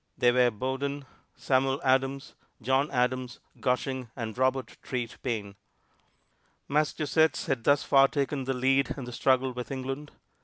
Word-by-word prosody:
They 120 - +4
were 125 0 +4
Bowdoin, 135 +5 -3 0.3
Samuel 135 +1 +1
Adams, 135 +1 +1 0.3
John 130 +4 +1
Adams, 125 -1 -1 0.2
Gushing 125 -1 -1
and 115 -3 -5
Robert 130 -1 0
Treat 120 -3 -5
Paine. 110 -6 -3 1.1
Massachusetts 155 +1 +1
had 135 -7 -1
thus 145 +3 +3
far 135 0 +5
taken 140 -1 -2
the 135 0 -1
lead 135 +2 +2
in 135 - -5
the 125 0 -7
struggle 130 +1 +2
with 125 -1 -6
England. 135 +2 -5
130 Hz, 140 wpm, -28 LUFS, 125-140 Hz, 1.1 s, far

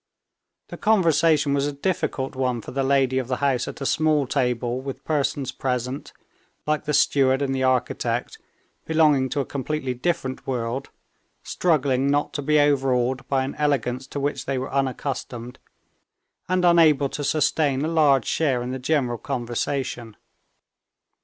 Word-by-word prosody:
The - - -8
conversation 165 -8 +3
was 140 0 +1
a - - -2
difficult 140 -3 -2
one 130 -2 -1
for - - -9
the 135 +1 -1
lady 135 -1 +2
of 130 - -4
the 130 - -1
house 130 -2 0
at - - -8
a - - -2
small 155 -1 +2
table 125 -2 -1
with 135 0 -7
persons 140 -3 -1
present, 125 +1 -3 0.5
like 150 0 -1
the 150 - -1
steward 135 0 +3
and 135 -1 -1
the 130 - -1
architect, 130 -1 -1 0.5
belonging 150 -5 +3
to 145 - -1
a - - -4
completely 140 -1 -3
different 130 0 -3
world, 125 +1 -3 0.5
struggling 140 -6 +1
not 145 +1 0
to 145 - -3
be 150 +2 +3
overawed 130 -3 +1
by 135 -1 +1
an 135 - -4
elegance 130 -3 0
to 140 - -5
which 145 +1 -2
they 135 -1 -1
were 130 +2 -4
unaccustomed, 130 -2 -3 0.9
and 185 -1 +2
unable 155 -5 +5
to 145 - -5
sustain 145 -1 +1
a - - 0
large 150 -6 +3
share 135 -6 0
in 125 - -4
the 130 - -4
general 125 -4 0
conversation. 120 -2 -3
135 Hz, 155 wpm, -23 LUFS, 130-145 Hz, 0.9 s, unable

